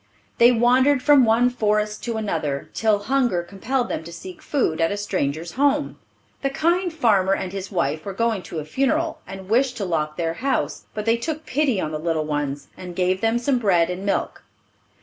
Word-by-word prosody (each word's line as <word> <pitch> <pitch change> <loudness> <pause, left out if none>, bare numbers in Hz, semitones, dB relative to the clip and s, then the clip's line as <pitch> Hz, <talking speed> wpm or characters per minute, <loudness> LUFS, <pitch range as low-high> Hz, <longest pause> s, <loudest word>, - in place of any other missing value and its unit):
They 235 +1 +7
wandered 255 +3 +3
from 285 -4 +6
one 235 +3 +3
forest 210 -2 0
to 230 -2 -2
another, 160 -10 -3
till 220 -2 +2
hunger 245 -8 +1
compelled 240 +8 -2
them - - -4
to 170 - -8
seek 175 +1 -10
food 170 - 0
at 165 - +2
a 205 - -2
stranger's 170 -5 -2
home. 285 +4 +1 0.4
The 275 - 0
kind 345 +5 +1
farmer 200 - +2
and 190 -1 -5
his 195 0 -5
wife 155 -4 -1
were 200 - -5
going 230 -2 0
to - - -6
a 155 - -4
funeral, 290 - 0
and 190 0 -9
wished 245 +3 +2
to 205 - -2
lock 150 -3 -2
their 165 -1 -1
house; 265 +10 -2
but 210 -1 -3
they 230 +1 +3
took 310 +5 -4
pity 270 -6 +1
on 155 - -2
the 155 - -3
little 160 -1 -1
ones, 145 -2 -3
and 180 -1 -9
gave 185 +1 +1
them 225 +1 +2
some 250 +1 +1
bread 180 -6 +2
and 180 +2 -5
milk. 200 - -2
210 Hz, 200 wpm, -23 LUFS, 170-255 Hz, 0.4 s, They